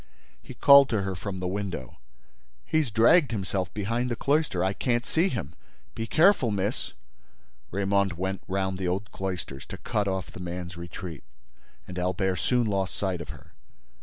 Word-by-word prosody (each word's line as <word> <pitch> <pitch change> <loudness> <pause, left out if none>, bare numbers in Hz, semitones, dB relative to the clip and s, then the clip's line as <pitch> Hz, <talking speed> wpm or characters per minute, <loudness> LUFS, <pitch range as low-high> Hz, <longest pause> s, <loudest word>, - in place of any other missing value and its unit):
He - - -11
called 140 -1 +8
to 110 -4 0
her 95 0 -2
from 95 +1 -5
the 90 - -2
window: 95 -9 -4 0.7
"He's 155 -5 +1
dragged 115 +8 +5
himself 95 -4 -2
behind 115 +4 -1
the 120 - -1
cloister. 140 - +1
I 95 +1 +1
can't 120 +2 0
see 170 +4 +2
him. 85 - -4 0.4
Be 115 - -4
careful, 165 - +4
miss—" 100 -1 -2 0.8
Raymonde 100 -1 +1
went 95 +3 -3
round 95 0 -1
the 95 - -1
old 95 +3 -2
cloisters, 90 -8 -5
to - - -7
cut 105 -1 -1
off 95 -1 -2
the - - -10
man's 90 -1 -5
retreat, 85 -2 -7 0.6
and 90 0 -5
Albert 90 +1 0
soon 125 -2 +2
lost 95 -4 -1
sight 95 -4 -1
of 80 - -9
her. - - -11
95 Hz, 165 wpm, -27 LUFS, 90-115 Hz, 0.8 s, called